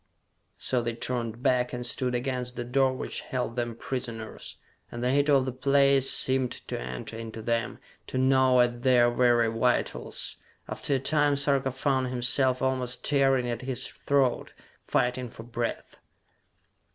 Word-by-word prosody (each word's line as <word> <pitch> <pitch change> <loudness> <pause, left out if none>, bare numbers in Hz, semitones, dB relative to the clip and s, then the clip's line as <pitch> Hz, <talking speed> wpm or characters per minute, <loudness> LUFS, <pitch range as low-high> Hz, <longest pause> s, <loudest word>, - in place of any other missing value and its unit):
So 125 -2 0
they 120 0 -3
turned 120 -1 -4
back, 125 -1 +2
and 125 0 -4
stood 125 0 -1
against 125 -1 -3
the 120 - -3
door 130 +2 +2
which 130 - -4
held 125 -2 -3
them 120 -2 -2
prisoners; 115 -3 -6 0.3
and 120 0 -5
the 125 - +2
heat 145 +2 +2
of 135 -2 +4
the 130 - -2
place 140 +1 +3
seemed 130 -1 +2 0.2
to - - -3
enter 65 - -6
into 115 0 -7
them, 115 0 -1 0.3
to - - -4
gnaw 130 -1 +4
at 120 0 0
their 120 -2 +4
very 120 -1 +3
vitals. 115 +2 -1 0.3
After 140 - -1
a - - +1
time 145 +1 +2
Sarka 140 -1 +1
found 130 0 0
himself 125 +1 +1
almost 130 -1 -1
tearing 135 -3 +3
at 120 -1 -3
his 130 -1 -3
throat, 135 -3 0 0.3
fighting 125 0 0
for 115 - -10
breath. 120 0 -4
125 Hz, 155 wpm, -27 LUFS, 120-130 Hz, 0.3 s, of